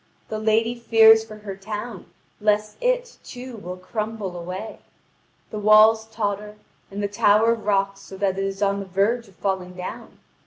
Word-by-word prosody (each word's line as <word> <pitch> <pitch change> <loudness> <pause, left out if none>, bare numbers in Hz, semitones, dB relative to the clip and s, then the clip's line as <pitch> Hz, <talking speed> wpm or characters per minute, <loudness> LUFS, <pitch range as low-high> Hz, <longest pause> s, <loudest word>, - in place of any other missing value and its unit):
The 215 - -3
lady 220 +2 +2
fears 225 -2 +6
for 220 -1 -11
her 210 -2 -8
town, 210 +1 -7 0.3
lest 210 0 +1
it, - - -1
too, 250 -1 -9
will 180 -3 -7
crumble 210 0 -4
away; 185 +5 -6 0.7
the 215 - -4
walls 215 +1 +6
totter, 210 -1 -3 0.3
and 200 +1 -5
the - - +1
tower 210 +3 +4
rocks 195 -3 0
so 195 -1 -11
that 190 -1 0
it - - 0
is 195 +1 -2
on 200 0 +1
the 195 - -6
verge 210 +5 0
of 195 - -20
falling 190 -2 -3
down. 180 0 -8
210 Hz, 165 wpm, -23 LUFS, 195-220 Hz, 0.7 s, fears